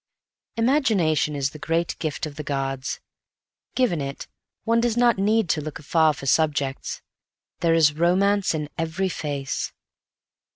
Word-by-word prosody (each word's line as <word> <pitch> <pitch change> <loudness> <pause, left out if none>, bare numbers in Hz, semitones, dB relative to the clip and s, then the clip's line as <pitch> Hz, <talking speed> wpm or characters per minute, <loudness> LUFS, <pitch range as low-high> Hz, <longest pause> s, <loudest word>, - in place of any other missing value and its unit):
Imagination 215 - +2
is 140 -1 -1
the 155 - -11
great 165 +3 -1
gift 155 -1 -2
of 150 -2 -8
the 150 - -5
gods. 135 -5 -3 0.8
Given 200 - +1
it, 140 0 -5 0.4
one 230 +1 +2
does 240 -1 0
not 240 -4 +4
need 215 +1 +2
to 155 - +1
look 155 0 -6
afar 160 +1 +3
for 135 - -9
subjects. 145 -2 0 0.6
There 165 -1 +3
is 155 -3 +5
romance 185 +4 +2
in 150 -1 -3
every 165 +4 -1
face. 145 -5 -3
160 Hz, 140 wpm, -24 LUFS, 145-195 Hz, 0.8 s, is